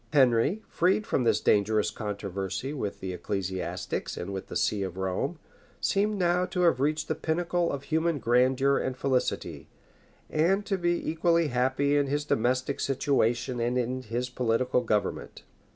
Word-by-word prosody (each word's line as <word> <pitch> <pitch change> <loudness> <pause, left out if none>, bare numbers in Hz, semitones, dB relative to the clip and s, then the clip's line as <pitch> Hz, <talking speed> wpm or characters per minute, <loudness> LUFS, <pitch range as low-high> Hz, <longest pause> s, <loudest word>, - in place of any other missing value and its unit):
Henry, 135 - +3
freed 190 +4 +1
from 130 - 0
this - - +3
dangerous 105 +1 +2
controversy 100 +3 -4
with 105 -9 -4
the 95 -1 -4
ecclesiastics 95 0 -3
and 95 +3 -5
with 95 0 -5
the - - -8
see 105 - +1
of 95 -2 -4
Rome, 95 -1 -2 0.4
seemed 205 +1 +1
now 180 -1 +2
to 180 - -2
have 170 -7 +4
reached 155 +3 0
the - - 0
pinnacle 170 +2 0
of 140 -1 -4
human 160 +1 0
grandeur 130 +2 +3
and 130 -1 -3
felicity, 130 -2 -1 0.6
and 190 +6 +1
to 195 -2 -1
be 175 0 0
equally 165 0 +2
happy 130 +3 +1
in 145 -1 +2
his 145 +2 -1
domestic 130 +2 0
situation 130 -3 0
and 120 +2 0
in 125 +1 -1
his 120 +2 -3
political 125 +1 +1
government. 105 -3 -2
130 Hz, 155 wpm, -28 LUFS, 115-160 Hz, 0.6 s, have